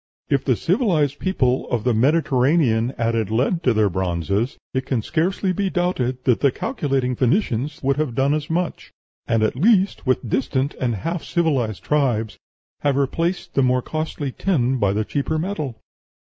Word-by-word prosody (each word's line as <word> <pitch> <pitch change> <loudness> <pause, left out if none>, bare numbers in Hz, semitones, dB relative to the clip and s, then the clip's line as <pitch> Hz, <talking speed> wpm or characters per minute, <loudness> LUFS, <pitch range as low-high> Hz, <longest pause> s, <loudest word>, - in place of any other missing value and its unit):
If 140 - +2
the 130 - +2
civilized 165 - +1
people 130 -9 0
of 115 -3 -1
the 125 -1 +2
Mediterranean 130 -2 +2
added 115 -2 0
lead 130 - +1
to 125 - +2
their 110 -2 +3
bronzes, 95 - -1 0.2
it 130 0 -2
can 120 -5 0
scarcely 185 - 0
be 195 +1 -1
doubted 130 -9 -1
that 125 -3 +2
the 140 - +3
calculating 135 - -1
Phoenicians 140 - 0
would 135 +1 +1
have 150 -6 -1
done 135 +2 +2
as 150 -1 -2
much, 175 +1 -2 0.4
and, 115 -1 +2
at 110 - +1
least, 195 - +2
with 130 -1 +1
distant 130 +4 0
and 120 -3 0
half 165 - -3
civilized 135 - 0
tribes, 120 -8 0 0.4
have 145 -2 +1
replaced 165 +6 -1
the 135 - +2
more 125 -1 +2
costly 155 -3 -3
tin 130 -7 0
by 100 -3 +2
the 105 +2 -1
cheaper 145 +5 -1
metal.... 155 - -3
135 Hz, 165 wpm, -22 LUFS, 120-160 Hz, 0.4 s, their